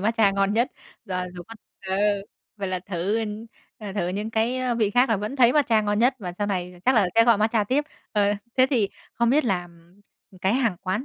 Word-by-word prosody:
matcha 220 0 +3
ngon 195 +1 +1
nhất? 235 +3 +1 0.3
Rồi, 180 -3 -3
dù 175 - -7
có 225 - -9 0.3
ờ. 190 - -1 0.6
Vậy 195 -2 -3
là 185 -1 -2
thử, 195 +3 -2 0.6
ờ, 205 -3 -7
thử 185 -4 -1
những 205 +4 -3
cái 245 +2 0
vị 215 -3 +1
khác 245 +5 +3
là 225 - +2
vẫn 210 +7 -4
thấy 245 -2 +5
matcha 235 -7 +3
ngon 205 0 0
nhất 250 +3 +3
và 180 -5 -6
sau 205 - 0
này 180 -2 -4
chắc 260 +1 +4
là 205 -5 +4
sẽ 230 0 +6
gọi 230 -3 +4
matcha 215 0 +2
tiếp? 270 +8 0 0.3
Ờ, 205 -1 +2 0.2
thế 255 0 +5
thì 220 -7 +2 0.3
không 235 0 +2
biết 295 0 +3
là 180 -5 -1 0.7
cái 190 +4 +2
hàng 235 -8 +1
quán 195 +6 -2
210 Hz, 215 wpm, -24 LUFS, 195-235 Hz, 0.7 s, sẽ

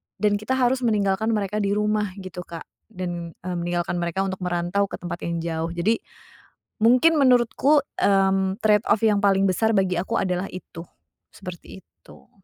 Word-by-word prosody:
dan 205 -1 +1
kita 235 +5 -1
harus 255 0 +2
meninggalkan 210 -3 +1
mereka 210 0 -2
di 200 0 0
rumah, 210 -2 0
gitu, 185 -1 -8
Kak, 165 -1 -8 0.2
dan, 175 -5 -6
mmm, 180 -1 -3
meninggalkan 175 0 -1
mereka 170 +3 -1
untuk 190 0 -4
merantau 180 +2 -1
ke - - -6
tempat 175 -1 -6
yang 170 -1 -3
jauh, 165 0 -3
jadi 205 +7 +1 0.8
mungkin 255 +9 +4
menurutku, 265 +2 +4 0.2
mmm, 195 0 +2
trade 210 -1 +3
off 220 - +2
yang 215 -2 +3
paling 195 -1 +3
besar 220 +5 +1
bagi 190 -3 +1
aku 190 +6 -3
adalah 180 0 -1
itu. 175 -2 -9 0.5
Seperti 180 +1 -10
itu. - - -20
195 Hz, 165 wpm, -23 LUFS, 180-215 Hz, 0.8 s, mungkin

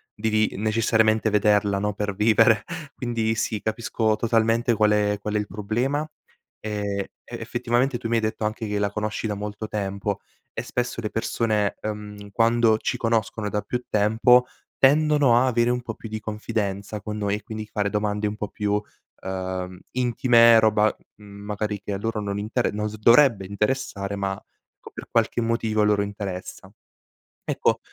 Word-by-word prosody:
devi 110 0 +1
necessariamente 110 0 +2
vederla 105 -1 +3
no, 105 +1 -1
per 105 0 -3
vivere. 110 +1 +4 0.3
Quindi 115 -2 -1
sì, 110 -1 -2
capisco 110 0 0
totalmente 115 +2 +2
qual 105 0 +3
è 105 0 +2
qual 105 0 -3
è - - +3
il 105 -1 -2
problema 120 +10 -2 0.5
e 100 -2 -3 0.2
e - - -5
effettivamente 120 +2 0
tu 115 - -5
mi 115 - +1
hai 115 - +2
detto 110 0 -2
anche 110 +1 -2
che 105 0 -2
la 100 0 0
conosci 105 +1 -3
da 105 -1 -1
molto 105 +1 -5
tempo 100 -1 -3 0.3
e - - -4
spesso 125 -1 -3
le 110 -2 -3
persone, 110 -2 0
ehm, 105 -1 -6
quando 115 0 +3
ci - - -2
conoscono 115 -2 -1
da 105 0 -1
più 125 +3 -4
tempo 110 +4 +4 0.3
tendono 145 -2 +4
a 125 - +4
avere 120 -2 +2
un 125 0 0
po' 115 -2 -5
più 110 - -10
di 110 0 -4
confidenza 105 -1 -3
con 105 +2 -5
noi 100 -1 0
e 105 - -7
quindi 110 -1 -6
fare 105 -1 -1
domande 105 0 -1
un 105 - -3
po' 105 -1 -4
più, 105 0 -1 0.4
ehm, 95 -1 -4
intime 120 -2 +5
roba, 110 -1 +3 0.2
mhmm, 100 -1 -12
magari 105 0 -3
che 100 - -5
a - - -2
loro 115 +1 -2
non 100 -1 -3
intere 110 +4 -1
non 105 +1 -2
s 110 - -9
dovrebbe 115 -1 +5
interessare 100 -1 -2
ma 95 0 -1 0.6
per - - -9
qualche 115 +1 +1
motivo 115 -2 0
a - - +4
loro 105 -1 +3
interessa. 100 -2 -6 0.7
Ecco, - - +1
110 Hz, 170 wpm, -24 LUFS, 105-115 Hz, 0.7 s, intime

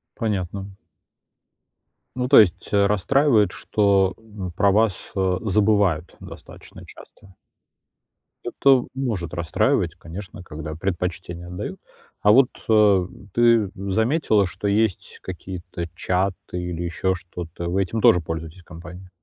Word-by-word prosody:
Понятно. 100 -3 -3 1.5
Ну 125 0 -1
то 140 - +9
есть, 95 -3 +1
э, 100 -1 +4
расстраивает, 105 +1 +2
что, 95 0 +1
м, 105 -5 -8
про 100 +4 +2
вас, 105 0 +3 0.2
э, 95 -1 +1
забывают 100 -5 +1
достаточно - - -12
часто. 95 -1 -16 1.1
Это 135 -3 +3
может 110 - -3
расстраивать, 85 -3 0
конечно, 95 +3 -9
когда 80 -2 -7
предпочтение 90 0 -4
отдают. 90 0 -6 0.4
А 105 - +6
вот, 130 +2 +6 0.2
а, 105 -4 +4 0.3
ты 115 -4 +4
заметила, 105 - +1
что 100 +3 -4
есть 105 -2 0
какие-то 90 -1 -7
чаты 95 +2 0 0.3
или 90 -1 -4
еще 85 +2 -1
что-то, 85 -1 -7
вы 95 +2 +1
этим 105 +4 -3
тоже 90 - +5
пользуетесь 80 +2 -7
компанией? 90 +3 -11
95 Hz, 120 wpm, -23 LUFS, 90-105 Hz, 1.5 s, то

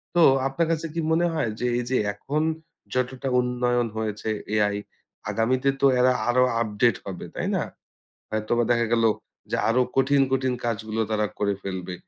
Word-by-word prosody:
তো 170 - +5 0.3
আপনার 160 +4 0
কাছে 165 0 -1
কি 165 - -2
মনে 170 +2 +3
হয় 120 -8 0
যে, 125 - -1
এই - - -1
যে 130 - +2 0.2
এখন 145 +9 -2 0.5
যতটা 130 +1 -1
উন্নয়ন 125 -1 +1
হয়েছে 110 0 -3 0.3
এআই 105 -1 +2 0.5
আগামীতে 125 +6 +1
তো - - +5
এরা 125 0 +5 0.2
আরো 125 +1 +4 0.2
আপডেট 110 0 +2
হবে, 95 -2 -6
তাই - - -2
না? - - +1 0.7
হয়তোবা 110 +2 0
দেখা 120 -1 +3
গেলো 115 -1 +4 0.4
যে - - +1
আরো 125 +3 +3 0.2
কঠিন, 135 +1 +4
কঠিন 130 -1 +1
কাজগুলো 110 -1 -2
তারা 105 -1 +1
করে 100 -1 +1
ফেলবে। 95 -2 -5
120 Hz, 165 wpm, -25 LUFS, 110-130 Hz, 0.7 s, তো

